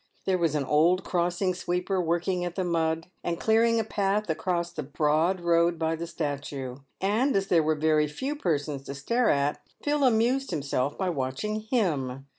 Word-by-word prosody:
There 185 -1 +1
was 165 -3 +1
an 145 - +1
old 165 +7 +3
crossing 175 +2 0
sweeper 180 +1 -1
working 175 +2 0
at 175 -1 -4
the 190 - -1
mud, 165 -1 0 0.2
and 170 0 -2
clearing 230 +1 +3
a - - +1
path 205 -2 0
across 170 +2 -1
the 155 - -5
broad 155 +5 +1
road 170 0 +3
by 160 0 0
the 170 +1 -5
statue; 140 -5 -4 0.2
and, 220 +8 +1
as 195 0 0
there 170 -2 +5
were 155 0 +1
very 155 0 +2
few 265 - -4
persons 150 - -1
to 140 - -6
stare 235 - +1
at, 140 +1 +1 0.2
Phil 295 -1 +1
amused 250 +2 +2
himself 140 -3 -1
by 190 -2 0
watching 145 +10 -2
him. 135 - 0
170 Hz, 180 wpm, -27 LUFS, 150-195 Hz, 0.2 s, there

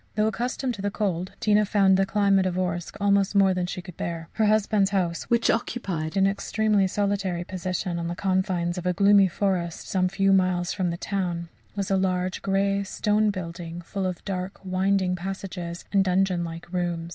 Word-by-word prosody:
Though 215 0 +2
accustomed 245 +3 -1
to 205 - -7
the 205 - 0
cold, 185 -3 -2
Tina 210 0 +3
found 195 -2 +4
the 195 0 +2
climate 200 -2 +3
of 180 - -2
Orsk 175 -2 -2
almost 200 0 +2
more 195 -1 +5
than 180 -1 -1
she 180 0 -5
could 180 -2 -11
bear. 165 -1 -4
Her 220 -1 +2
husband's 210 -2 +3
house, 180 -4 -1
which 235 -1 +2
occupied 190 -8 -2
an 195 - +4
extremely 200 0 +1
solitary 195 -3 -1
position 180 -1 -3
on 170 - -3
the 170 - -3
confines 185 -2 0
of 180 - -4
a 180 - +2
gloomy 200 +1 +5
forest, 180 -2 -2
some 185 -1 +1
few 195 +1 +2
miles 185 -2 +2
from 185 -3 -1
the 170 - -3
town, 175 -4 -3 0.3
was 200 -1 -2
a 195 - +3
large, 185 -1 -1
grey 195 0 +1
stone 210 +2 +1
building 170 -3 -5
full 190 +2 -3
of 180 -2 -5
dark 190 0 -4
winding 185 0 +1
passages 180 -2 -6
and 195 -1 +5
dungeon 185 -1 +1
like 170 +1 -8
rooms. 175 -2 -2
190 Hz, 190 wpm, -25 LUFS, 175-200 Hz, 0.3 s, more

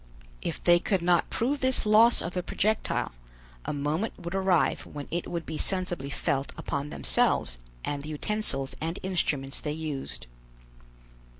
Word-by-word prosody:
If - - -4
they 175 0 +6
could 185 0 0
not 175 -1 +3
prove 275 +5 0
this 260 -3 +3
loss 220 +3 +6
of 170 - -4
the 180 - 0
projectile, 215 +4 0 0.5
a - - -1
moment 150 +9 -1
would 175 -1 -6
arrive 190 -3 +2
when 145 -1 -7
it 175 +1 -2
would 170 -2 -3
be 155 -1 -4
sensibly 180 -7 -1
felt 140 0 -1
upon 140 0 -3
themselves - - +2 0.3
and 145 -1 -2
the 150 - -7
utensils 155 -4 -1
and 165 +3 -2
instruments 145 -7 0
they 150 - -2
used. 140 - -5
170 Hz, 155 wpm, -28 LUFS, 145-190 Hz, 0.5 s, they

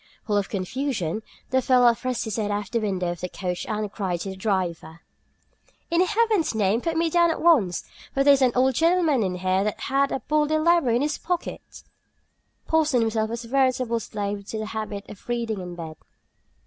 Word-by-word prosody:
Full 210 - 0
of 205 -1 0
confusion, 215 - -2 0.3
the 260 0 +3
fellow 250 -1 +5
thrust 250 0 -3
his 220 -1 -3
head 210 -2 -1
out 205 0 -1
of 200 - -17
the 235 - +1
window 190 -5 -1
of 175 - -7
the 180 - -3
coach 180 -1 -4
and 215 -2 -2
cried 185 -5 -2
to 195 - -4
the 190 - -6
driver: 180 -5 -2 0.9
"In 340 +1 +3
heaven's 425 - +1
name, 215 +2 +2
put 330 +2 -1
me 335 0 +2
down 340 +1 +3
at 325 - -1
once; 255 - +3 0.3
for 275 - +1
there 285 0 +7
is 275 - +2
an 255 -2 +4
old 260 +1 +3
gentleman 330 -3 +3
in 185 -3 -1
here 185 +1 +1
that 210 0 -2
hath 275 +1 +1
the - - -2
Bodleian 305 +1 +2
Library 335 -8 +3
in 245 - +1
his 295 0 -1
pocket!" 350 0 -5 0.8
Porson 305 -6 +2
himself 220 -1 0
was 235 +1 -5
a - - -10
veritable 255 -2 +1
slave 205 -2 -4
to 220 - -4
the 215 - -3
habit 210 -2 -5
of 205 - -13
reading 230 -4 -2
in 180 -1 -7
bed. 160 -2 -8
230 Hz, 205 wpm, -24 LUFS, 200-275 Hz, 0.9 s, there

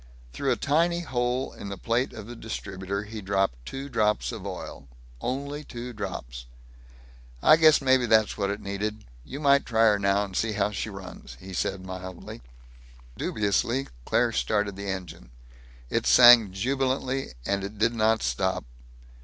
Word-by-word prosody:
Through - - -1
a - - +3
tiny 170 +4 +1
hole 125 -3 -1
in 100 - -8
the 100 - -6
plate 120 +6 0
of - - -9
the 120 +2 -9
distributor 100 -3 -5
he 110 +1 -8
dripped 95 -11 0
two 135 +1 -5
drops 105 -5 +1
of 105 -4 -7
oil 90 -7 -7 0.3
only 140 +3 -3
two 125 -2 -7
drops. - - -6 1.0
"I - - +8
guess 155 -3 +5
maybe 130 -2 +3
that's 110 -1 +3
what 100 -2 -1
it 100 +1 -3
needed. 105 +2 -4 0.2
You 135 - -8
might 140 -1 +4
try 115 -2 0
her 105 -2 +5
now, 100 +1 +2
and 95 -2 -10
see 110 +2 0
how 100 0 0
she 105 +2 -3
runs," 95 - -10
he 95 0 -10
said 95 +1 -2
mildly. 95 -5 -8 0.7
Dubiously 115 +6 0
Claire - - +2
started 100 - 0
the 100 0 -5
engine. 90 -10 -6 0.6
It - - 0
sang 120 -5 +8
jubilantly, 130 - -1
and 100 -1 -1
it 100 +2 -6
did 115 +3 +2
not 110 0 +2
stop. 95 -2 -1
105 Hz, 160 wpm, -26 LUFS, 95-125 Hz, 1.0 s, I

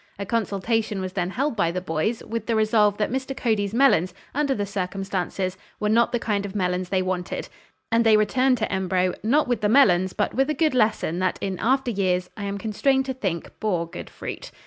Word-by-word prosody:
A 200 - -4
consultation 220 0 -1
was 185 -1 -4
then 180 -2 -1
held 270 +6 -1
by 185 -6 +2
the 180 +2 -2
boys, 180 +6 -2
with 225 -1 -4
the 230 - +1
resolve 215 -1 +3
that 210 - -1
Mr. 265 +1 -3
Cody's 210 -4 0
melons, 205 -8 +3 0.2
under 280 -1 +1
the 205 - -1
circumstances, 190 -1 -3 0.2
were 210 - 0
not 230 +2 +3
the 240 - +1
kind 210 -3 -1
of 200 0 -7
melons 180 -2 -1
they 190 -1 +1
wanted, 185 -1 -3 0.4
and 230 +1 +4
they 220 -1 +6
returned 255 +5 +2
to 220 - -2
Embro, 185 -1 +1
not 275 +7 +2
with 245 -3 0
the 210 - +2
melons, 185 -8 +4
but - - -1
with 270 +3 +1
a 305 - 0
good 310 0 +2
lesson 215 -8 +1
that 185 -1 0
in 190 -2 -3
after 260 +1 +1
years, 185 -3 0
I 205 - -5
am 200 0 -3
constrained 265 +6 +1
to 265 - -2
think, 190 -9 -3
bore 180 -6 0
good - - -8
fruit. - - -7
210 Hz, 215 wpm, -24 LUFS, 185-235 Hz, 0.4 s, they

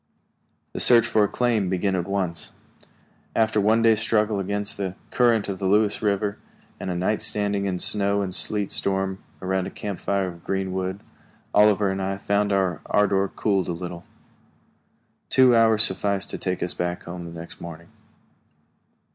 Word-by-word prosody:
The - - -4
search 120 -2 +6
for 110 -3 +2
a - - +3
claim 115 -4 0
began 95 +1 0
at 90 0 -2
once. 95 -4 -3 0.8
After 110 -1 +2
one 110 +3 +3
day's 110 -2 +4
struggle 110 -2 +1
against 100 +3 -3
the 95 -2 -4 0.2
current 120 -4 +2
of 95 -2 -4
the 95 - -1
Lewis 105 +1 +2
River, 100 -1 -1 0.4
and - - -5
a 90 - -2
night 95 +5 -1
standing 100 -1 -1
in 95 - -1
a - - -5
snow 100 0 +2
and 95 -1 -4
sleet 105 +1 +1
storm 95 0 +1 0.2
around 95 0 -1
a - - -5
camp 100 -3 -6
fire 100 -1 -1
of 85 -1 -12
green 95 -1 -2
wood, 95 +1 -3 0.5
Oliver 105 -1 +4
and 95 0 -3
I 95 +1 -2
found 100 +1 0
our 95 -4 0
ardor 100 -1 +2
cooled 95 -2 -1
a 85 - -2
little. 85 0 -7 1.3
Two 130 -2 +5
hours 110 -1 +5
sufficed 100 0 -1
to - - -5
take 90 -1 -2
us 90 - +1
back 90 0 -3
home 85 -1 -8
next 85 0 -10
morning. 85 0 -9
100 Hz, 170 wpm, -24 LUFS, 95-105 Hz, 1.3 s, search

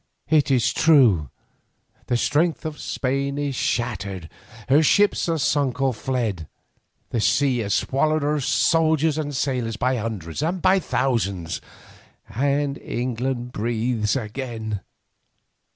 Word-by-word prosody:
It 155 -3 +4
is 130 -4 +2
true, 120 - +4 0.8
the 120 - +1
strength 160 +6 +1
of 155 -1 -5
Spain 140 +2 -2
is 145 -1 -1
shattered, 100 -9 -2 0.4
her 140 +4 +5
ships 200 +3 +3
are 165 - +1
sunk 140 -3 0
or 135 -1 +2
fled, 110 - -2 0.6
the 115 - 0
sea 125 +3 +2
has 105 -3 0
swallowed 155 +3 +1
her 150 +1 +1
soldiers 155 +4 +2
and 155 - -2
her 145 - -6
sailors 125 -5 -1
by 125 +2 +1
hundreds 105 - -4
and 170 +4 -1
by 190 +3 +4
thousands, 100 - -1 0.7
and 140 +2 -1
England 125 0 -3
breathes 115 0 -1
again. 110 -3 -4
130 Hz, 125 wpm, -23 LUFS, 115-145 Hz, 0.8 s, her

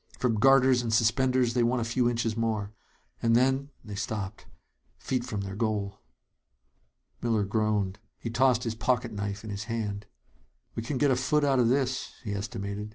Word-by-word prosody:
From 115 -4 +1
garters 130 0 +5
and 115 -2 -2
suspenders 125 +2 +3
they 125 - +2
won 120 +2 +2
a - - 0
few 120 +1 +1
inches 115 -2 -1
more. 110 -3 -1 0.5
And 115 0 +3
then 135 +3 +2 0.2
they 105 - -7
stopped 105 -1 -4 0.5
feet 130 -2 -2
from 110 -5 -4
their 95 0 -5
goal. 105 -2 -2 1.2
Miller 115 -3 +1
groaned. 105 -1 0 0.2
He 115 - -5
tossed 125 0 +3
his 115 -3 -2
pocket 115 +1 0
knife 100 0 -4
in 110 - -6
his 100 0 -4
hand. 105 -3 -3 0.7
"We - - -3
can 130 +4 -3
get 145 +1 +3
a - - +4
foot 145 +4 +1
out 135 -2 +3
of 120 -2 +4
this," 130 0 0
he 105 -4 -3
estimated. 100 0 -4
115 Hz, 175 wpm, -28 LUFS, 105-125 Hz, 1.2 s, garters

